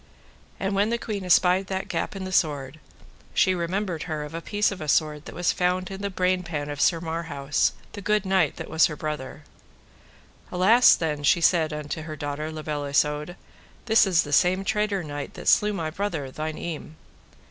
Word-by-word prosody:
And 195 0 -1
when 200 +2 +2
the 235 - 0
queen 210 -4 -4
espied 180 +1 +3
that 190 +1 -3
gap 210 - -3
in 195 - -5
the 185 - -5
sword, 150 -4 0 0.6
she 185 - +4
remembered 180 0 -2
her 155 -1 -2
of 150 - -9
a 165 - -4
piece 205 +4 0
of 195 - -7
a 155 - -5
sword 150 0 +1
that - - -9
was 175 +1 +1
found 180 +1 0
in 195 0 -6
the 200 - -2
brain 185 -1 +1
pan 150 -4 -4
of 145 - -4
Sir 170 - +3
Marhaus, 160 -4 -1 0.2
the 205 - -8
good 210 0 +1
knight 190 -6 +2
that - - -7
was 160 0 +4
her 150 - -6
brother. 150 -4 -5 1.1
Alas 215 +8 +6
then, 150 -3 -2
said 165 +1 +3
she - - -4
unto 150 +2 -5
her 155 0 -7
daughter, 145 +1 -4
La 155 -1 -7
Beale 150 -1 -3
Isoud, 150 +3 0 0.5
this 220 -3 +5
is 175 -3 +3
the 145 - -6
same 185 +5 +3
traitor 210 -2 0
knight 145 -2 -6
that - - -8
slew 210 0 +5
my 165 -6 -3
brother, 160 -7 -3
thine 155 +2 -4
eme. 160 -2 -6
170 Hz, 200 wpm, -25 LUFS, 150-190 Hz, 1.1 s, Alas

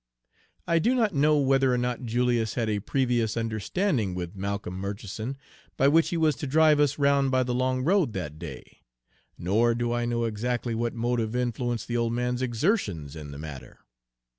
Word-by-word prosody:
I 165 0 +3
do 240 +9 +2
not 220 -5 +2
know 150 +1 +3
whether 135 -1 +3
or 125 - +2
not 125 +1 -2
Julius 120 -1 0
had 115 -3 0
a 105 - 0
previous 120 -1 0
understanding 115 - -1
with 90 +1 -5
Malcolm 100 -1 -4
Murchison 100 +6 -5 0.4
by 135 - +4
which 165 +2 +4
he 170 - -1
was 155 -3 +3
to 145 - -4
drive 155 +1 +4
us 145 -1 +2
round 140 -1 +3
by 130 -1 +2
the 125 0 -2
long 130 +1 0
road 175 - +2
that 80 -5 -5
day, 75 -7 -9 0.6
nor 115 +6 +2
do 120 0 -1
I 120 0 0
know 120 0 -1
exactly 115 +2 -2
what 115 +1 -2
motive 115 -1 -1
influenced 120 -1 -2
the 120 - -1
old 115 0 0
man's 125 +1 -1
exertions 115 - -1
in 75 -2 -8
the 70 - -8
matter. 75 -3 -9
120 Hz, 185 wpm, -27 LUFS, 110-135 Hz, 0.6 s, by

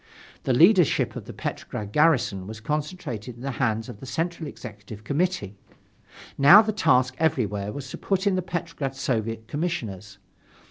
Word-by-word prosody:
The 130 - +2
leadership 175 - +4
of - - -7
the - - -8
Petrograd 105 -1 -5
garrison 120 - +2
was 110 0 -7
concentrated 140 - -4
in 120 - -12
the 135 - -2
hands 115 -2 0
of 120 -5 -9
the 135 - -10
Central 165 +3 -3
Executive 105 -5 -10
Committee. 140 - -1 0.8
Now 175 +10 +9
the 215 0 -2
task 130 -10 +3
everywhere 105 -10 0
was 140 +3 -7
to - - -7
put 195 0 -1
in 200 - +3
the 185 - +1
Petrograd 165 -6 -4
Soviet's 115 -4 -2
Commissioners. 110 - -4
130 Hz, 155 wpm, -25 LUFS, 110-165 Hz, 0.8 s, Now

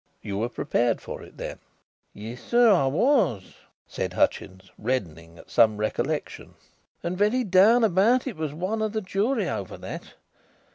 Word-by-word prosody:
"You 100 -1 -4
were 115 +2 -1
prepared 120 -3 0
for - - -8
it - - -14
then?" - - -6 0.5
"Yes, 115 +4 -9
sir, 240 -1 +4
I 170 -9 +3
was," 145 - +1 0.3
said - - -4
Hutchins, 95 0 -1
reddening 85 -9 -3
at - - -16
some 110 -2 +4
recollection, 110 +1 -3 0.5
"and 175 +1 -2
very 210 +6 +2
down 210 +4 +5
about 220 +5 +3
it 260 -6 -4
was 155 -2 -3
one 185 +8 -3
of 215 -1 -1
the 220 - -1
jury 200 +7 0
over - - -4
that. - - -9
175 Hz, 155 wpm, -25 LUFS, -, 0.5 s, down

